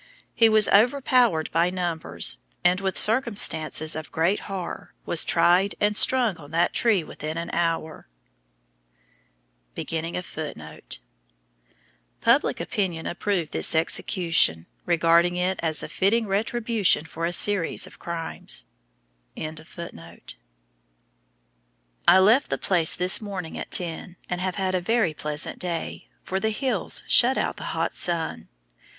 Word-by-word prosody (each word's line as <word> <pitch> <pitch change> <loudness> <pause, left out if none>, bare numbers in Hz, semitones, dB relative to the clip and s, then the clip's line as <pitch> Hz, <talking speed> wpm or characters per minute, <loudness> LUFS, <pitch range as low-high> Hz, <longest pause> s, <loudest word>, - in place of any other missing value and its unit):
He 230 -1 +4
was 215 -1 +5
overpowered 240 - +3
by 170 +2 +2
numbers, 175 -3 -1 0.2
and, 180 +2 +2
with 190 -1 -2
circumstances 195 - +2
of 155 -1 -7
great 170 +6 +1
horror, 190 -3 -7
was 170 - +2
tried 175 +4 +2
and 210 0 +1
strung 240 -5 +3
on 145 -3 -13
that 165 +2 0
tree 215 -7 +2
within 155 +1 -7
an 170 0 -5
hour. 165 - -2 1.7
Public 165 0 -4 2.5
opinion 175 -5 -3
approved 180 -2 -2
this - - +3
execution, 165 - +2 0.2
regarding 170 +1 +3
it 185 +1 -1
as 160 -2 -2
a - - -5
fitting 220 +4 +1
retribution 215 -3 +1
for 165 +1 -4
a - - -3
series 195 -1 +1
of - - -15
crimes. 165 - -4 0.7
I 155 0 -5 2.6
left 220 +9 +4
the - - -1
place 170 -4 +1
this 180 +4 +2
morning 190 -6 -6
at - - -6
ten, 175 0 -1
and 180 0 -4
have 185 -1 -2
had 190 -1 -2
a 185 - 0
very 220 -3 +1
pleasant 150 0 -2
day, 170 -2 -5 0.2
for 190 - -3
the 220 - 0
hills 220 -3 -2
shut 255 +2 +5
out - - -2
the - - -8
hot - - -1
sun. 170 -2 -1
180 Hz, 125 wpm, -24 LUFS, 165-205 Hz, 2.6 s, was